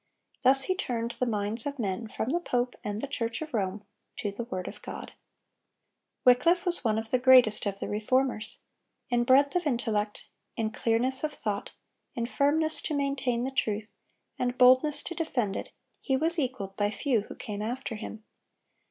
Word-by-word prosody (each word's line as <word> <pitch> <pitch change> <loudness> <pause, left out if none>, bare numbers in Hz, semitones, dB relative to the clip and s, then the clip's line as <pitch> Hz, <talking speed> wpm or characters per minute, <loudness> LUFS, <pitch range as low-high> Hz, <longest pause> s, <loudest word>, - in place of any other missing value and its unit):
Thus 270 +1 +6
he 370 - +1
turned 235 -10 -2
the 250 - -2
minds 215 +2 0
of 285 0 -4
men 220 -1 -2
from 220 +3 -3
the 345 - +1
pope 245 -7 -1
and 210 +1 -3
the 280 - -3
Church 230 -4 -2
of 310 - -10
Rome 200 -1 -1 0.3
to 205 - -2
the 225 +4 -5
word 185 -5 -5
of - - -8
God. - - -8 1.1
Wycliffe 335 +9 +5
was 350 -3 +1
one 220 -3 +2
of 220 0 -4
the 255 - +3
greatest 250 -5 +6
of 200 0 -3
the - - -3
Reformers. 225 +1 0 0.5
In 240 -1 +2
breadth 280 +5 +5
of 355 -3 +1
intellect, 220 -5 -1 0.3
in 220 -2 -1
clearness 245 +5 0
of 305 - 0
thought, 205 -7 -4 0.4
in 235 - -1
firmness 305 +5 +1
to 305 - -2
maintain 275 -4 0
the 265 - -2
truth, 215 -4 -2 0.5
and 250 0 -1
boldness 255 +4 +5
to - - -5
defend 245 - -1
it, - - -5 0.3
he 265 -2 +1
was 325 +4 +2
equaled 245 -8 -3
by 205 0 +1
few 235 +1 0
who - - -10
came 210 -4 -6
after 245 +3 -3
him. 220 0 -7
245 Hz, 180 wpm, -28 LUFS, 215-275 Hz, 1.1 s, Thus